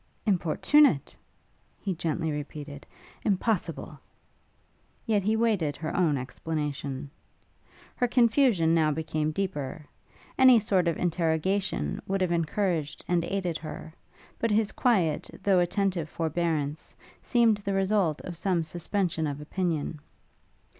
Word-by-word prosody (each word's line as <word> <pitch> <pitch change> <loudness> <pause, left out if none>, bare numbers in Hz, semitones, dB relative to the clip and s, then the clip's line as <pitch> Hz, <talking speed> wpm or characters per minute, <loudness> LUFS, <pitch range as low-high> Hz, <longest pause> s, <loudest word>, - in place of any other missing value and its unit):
'Importunate?' 190 - +3 0.6
he 195 - -2
gently 160 -1 -2
repeated, 145 -1 -7 0.3
'impossible!' 195 -4 -1 1.1
yet 215 -4 +2
he 215 +3 +1
waited 210 -10 +1
her 155 +1 -4
own 160 -6 +2
explanation. 140 +1 -4 0.9
Her 245 - +1
confusion 235 - +3
now 160 -2 +3
became 155 0 -1
deeper; 155 -4 -3 0.5
any 260 -2 +8
sort 195 -5 +2
of 165 - +1
interrogation 170 - 0
would 195 0 -1
have 180 -2 +1
encouraged 165 -2 -1
and 175 -1 +1
aided 180 -4 -2
her; 155 0 -8 0.5
but 230 - +1
his 210 0 +2
quiet, 180 -11 +1
though 195 -3 +4
attentive 175 -2 0
forbearance 160 -2 -2 0.3
seemed 235 -4 +3
the 200 -1 -3
result 195 -5 +1
of 175 - -7
some 175 -1 0
suspension 170 0 -2
of 145 0 -4
opinion. 160 -1 -2
170 Hz, 115 wpm, -28 LUFS, 155-200 Hz, 1.1 s, any